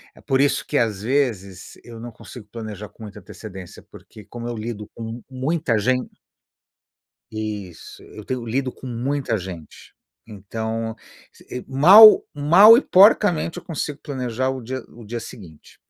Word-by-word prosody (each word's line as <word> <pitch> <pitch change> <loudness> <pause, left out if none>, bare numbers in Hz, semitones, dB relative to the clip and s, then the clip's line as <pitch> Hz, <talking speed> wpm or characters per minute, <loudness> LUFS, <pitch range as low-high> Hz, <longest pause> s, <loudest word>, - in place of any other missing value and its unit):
é - - -18
por 135 -2 0
isso 145 - +1
que, - - -1
às 105 -4 0
vezes, 110 -7 -3
eu 115 -1 -11
não 120 +1 -8
consigo 110 0 -13
planejar 105 -3 -8
com 110 - -15
muita 105 0 -10
antecedência, 95 -1 -11
porque 105 - -15
como 120 +3 -8
eu 120 - -4
lido 110 -1 -6
com 115 +1 -8
muita 135 -2 -1
gen 125 +4 0 1.2
Isso. 105 -5 -7
Eu 105 - -12
tenho 130 -1 -4
eu 120 - -9
lido 130 +3 -2
com - - -12
muita 125 0 -2
gente. 90 -4 -11 0.3
Então, 110 +2 -5 0.4
se - - -20 0.2
eh, - - -15
mal 190 +11 +8
mal 175 +10 +7
e 245 - +3
porcamente 185 - +3
eu - - -11
consigo 150 -3 -5
planejar 130 -2 -3
o 130 -1 -6
dia 130 +3 -5
o 115 0 -14
dia 115 +2 -6
seguinte. 85 -10 -13
120 Hz, 160 wpm, -21 LUFS, 105-135 Hz, 1.2 s, mal